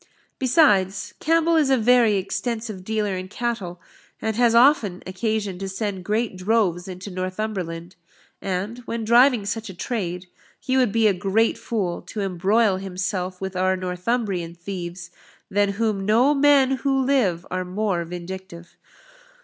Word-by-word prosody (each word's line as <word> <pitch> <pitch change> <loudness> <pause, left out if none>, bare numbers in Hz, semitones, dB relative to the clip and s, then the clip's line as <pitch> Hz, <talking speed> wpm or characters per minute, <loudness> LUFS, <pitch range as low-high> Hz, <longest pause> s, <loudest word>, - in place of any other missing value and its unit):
Besides, 235 - +3
Campbell 330 +1 +2
is 300 -4 +3
a 265 - +4
very 235 -2 +4
extensive 215 +1 -3
dealer 210 -1 -1
in 185 0 -5
cattle, 200 -5 -4 0.4
and 220 -1 -2
has 235 0 +3
often 235 -7 +4
occasion 200 0 -2
to 195 0 -4
send 195 -1 -4
great 215 0 -1
droves 185 -2 0
into 185 +2 -7
Northumberland; 185 -2 -4 0.5
and, 195 +5 -3
when 230 -1 -3
driving 240 -1 +5
such 220 +1 -3
a 190 - -9
trade, 180 -3 -3 0.3
he 260 0 -1
would 255 -5 +3
be 225 +1 +2
a 210 - +5
great 195 +5 +1
fool 195 -7 -3
to 210 - -5
embroil 195 +2 +2
himself 185 -1 -3
with 190 0 -5
our 185 +1 +2
Northumbrian 180 -1 -2
thieves, 175 -1 -7 0.4
than 200 0 +2
whom 210 -2 -1
no 235 +8 +4
men 275 -2 +4
who 270 0 0
live 205 -11 +1
are 185 0 -1
more 185 -1 -1
vindictive." 175 0 -8
200 Hz, 145 wpm, -23 LUFS, 185-230 Hz, 0.5 s, driving